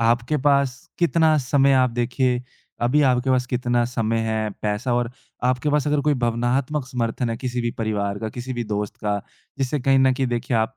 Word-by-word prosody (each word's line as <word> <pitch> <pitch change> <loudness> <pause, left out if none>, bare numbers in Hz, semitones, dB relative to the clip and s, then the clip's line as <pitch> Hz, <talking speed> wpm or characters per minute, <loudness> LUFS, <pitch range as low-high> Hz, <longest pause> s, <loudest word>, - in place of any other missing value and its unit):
आपके 120 +5 +2
पास 140 -2 +2 0.2
कितना 160 -2 +3
समय 140 +1 +3
आप 130 -1 +3
देखिए 125 +1 0 0.4
अभी 125 +5 +3
आपके 130 0 +2
पास 125 -1 +2
कितना 120 -1 0
समय 115 -2 -1
है, 110 -1 -1
पैसा 105 +4 -1
और 120 -1 0 0.3
आपके 130 +4 +1
पास 150 0 +1
अगर 150 0 +2
कोई 150 +1 +2
भावनात्मक 125 +4 0
समर्थन 120 -1 -2
है 115 - -2
किसी 125 -1 -3
भी 120 0 -1
परिवार 100 -2 -1
का, 110 - -3
किसी 125 +3 -6
भी 120 -1 -3
दोस्त 105 -1 -3
का, 105 -1 -1 0.4
जिससे 135 +1 -1
कहीं 135 +1 +3
न 130 0 +4
कहीं 130 0 0
देखिए 120 0 -1
आप 110 0 0
125 Hz, 195 wpm, -23 LUFS, 115-135 Hz, 0.4 s, न